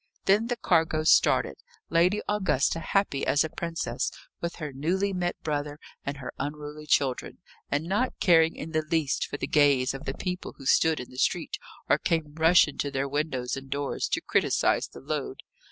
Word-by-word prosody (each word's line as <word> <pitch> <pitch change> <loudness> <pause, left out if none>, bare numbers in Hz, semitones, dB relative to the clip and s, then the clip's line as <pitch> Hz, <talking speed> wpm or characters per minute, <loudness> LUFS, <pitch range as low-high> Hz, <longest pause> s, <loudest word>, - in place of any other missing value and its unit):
Then 210 +4 +3
the 245 - -1
cargo 160 -7 +1
started! 70 - +4 0.3
Lady 180 +5 +3
Augusta 185 -7 +1
happy 165 -4 0
as 145 - +3
a 160 - -4
princess, 165 -1 -3 0.3
with 170 0 -3
her 150 -4 -6
newly 185 +8 0
met 175 -1 -2
brother 145 -1 -2 0.3
and 140 0 -4
her 130 - -7
unruly 150 +1 -6
children, 135 -4 +1 0.3
and 145 +2 0
not 210 +8 -1
caring 165 -3 +4
in 160 - -7
the 155 -1 +1
least 155 -2 0
for - - -5
the - - -3
gaze 140 -4 +3
of 135 +2 -8
the 135 - -3
people 180 0 -4
who 135 - -12
stood 160 +3 +3
in 125 - -8
the 130 - -8
street, - - 0 0.3
or - - +3
came 160 -3 -1
rushing 160 -1 +4
to 145 - 0
their 135 0 -2
windows 140 -3 -2
and 135 0 -8
doors 140 0 -2
to - - -1
criticise - - +1
the - - -13
load. - - -4
155 Hz, 185 wpm, -27 LUFS, 140-170 Hz, 0.3 s, started